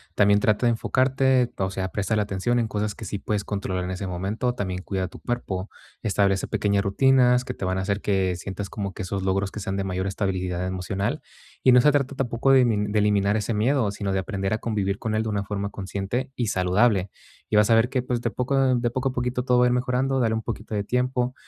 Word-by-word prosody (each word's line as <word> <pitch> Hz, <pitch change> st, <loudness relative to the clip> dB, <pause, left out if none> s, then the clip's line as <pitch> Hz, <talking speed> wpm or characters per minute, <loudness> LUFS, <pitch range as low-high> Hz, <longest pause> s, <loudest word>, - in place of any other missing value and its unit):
También 100 Hz, 0 st, +4 dB
trata 105 Hz, +3 st, +2 dB
de -, -, +5 dB
enfocarte 130 Hz, +1 st, +2 dB
o 95 Hz, -1 st, 0 dB
sea, 95 Hz, 0 st, -3 dB
préstale 105 Hz, +2 st, 0 dB
atención 105 Hz, +5 st, 0 dB
en 115 Hz, -, 0 dB
cosas 105 Hz, -1 st, -2 dB
que -, -, -9 dB
sí 100 Hz, -, -4 dB
puedes 105 Hz, 0 st, -2 dB
controlar 95 Hz, -3 st, -3 dB
en 90 Hz, -, -4 dB
ese 95 Hz, +1 st, -4 dB
momento, 100 Hz, +7 st, -2 dB
también 95 Hz, -4 st, -3 dB
cuida 95 Hz, -2 st, -2 dB
tu -, -, -12 dB
cuerpo, 105 Hz, -6 st, -3 dB, 0.3 s
establece 100 Hz, -3 st, +1 dB
pequeñas 100 Hz, -1 st, +1 dB
rutinas 125 Hz, +3 st, +4 dB
que 125 Hz, -, -5 dB
te 100 Hz, -, -5 dB
van 95 Hz, 0 st, 0 dB
a -, -, -1 dB
hacer 100 Hz, +1 st, -1 dB
que 95 Hz, -3 st, 0 dB
sientas 95 Hz, +2 st, -6 dB
como 100 Hz, -2 st, -4 dB
que -, -, -7 dB
esos 95 Hz, +1 st, -3 dB
logros 95 Hz, +1 st, 0 dB
que 105 Hz, -, -6 dB
sean 95 Hz, 0 st, -3 dB
de 100 Hz, -, -1 dB
mayor 95 Hz, 0 st, -2 dB
estabilidad 95 Hz, -2 st, -2 dB
emocional. 95 Hz, +2 st, -2 dB, 0.4 s
Y 130 Hz, -, +6 dB
no 125 Hz, -, +7 dB
se 150 Hz, -, +5 dB
trata 140 Hz, -1 st, 0 dB
tampoco 130 Hz, 0 st, +1 dB
de 135 Hz, -1 st, +7 dB
emi 105 Hz, -4 st, +1 dB
de 105 Hz, 0 st, +1 dB
eliminar 100 Hz, 0 st, +2 dB
ese 110 Hz, +2 st, -1 dB
miedo, 110 Hz, +1 st, +1 dB
sino 100 Hz, -1 st, -3 dB
de 95 Hz, -, +1 dB
aprender 95 Hz, +1 st, -2 dB
a 110 Hz, -, -1 dB
convivir 100 Hz, -3 st, -1 dB
con 110 Hz, -1 st, -2 dB
él 110 Hz, -, +1 dB
de 110 Hz, -, -3 dB
una 100 Hz, -1 st, -1 dB
forma 100 Hz, 0 st, -3 dB
consciente 100 Hz, +7 st, -4 dB
y 120 Hz, -3 st, 0 dB
saludable. 95 Hz, +1 st, +2 dB, 0.4 s
Y -, -, 0 dB
vas 105 Hz, +1 st, +4 dB
a 115 Hz, -, +6 dB
ver 115 Hz, +2 st, +3 dB
que, 130 Hz, -1 st, 0 dB
pues, 125 Hz, -1 st, -2 dB
de 120 Hz, -, 0 dB
poco 125 Hz, +4 st, -1 dB
a 135 Hz, -1 st, +3 dB
de 120 Hz, 0 st, 0 dB
poco 130 Hz, +2 st, -1 dB
a -, -, -4 dB
poquito 125 Hz, 0 st, -1 dB
todo 125 Hz, -1 st, +2 dB
va 125 Hz, -, +5 dB
a -, -, +4 dB
ir 125 Hz, -, +2 dB
mejorando, 130 Hz, +2 st, 0 dB
dale 115 Hz, -3 st, +2 dB
un 110 Hz, -, -2 dB
poquito 110 Hz, -1 st, -5 dB
de 100 Hz, -, 0 dB
tiempo, 125 Hz, +2 st, 0 dB
105 Hz, 245 wpm, -24 LUFS, 95-125 Hz, 0.4 s, no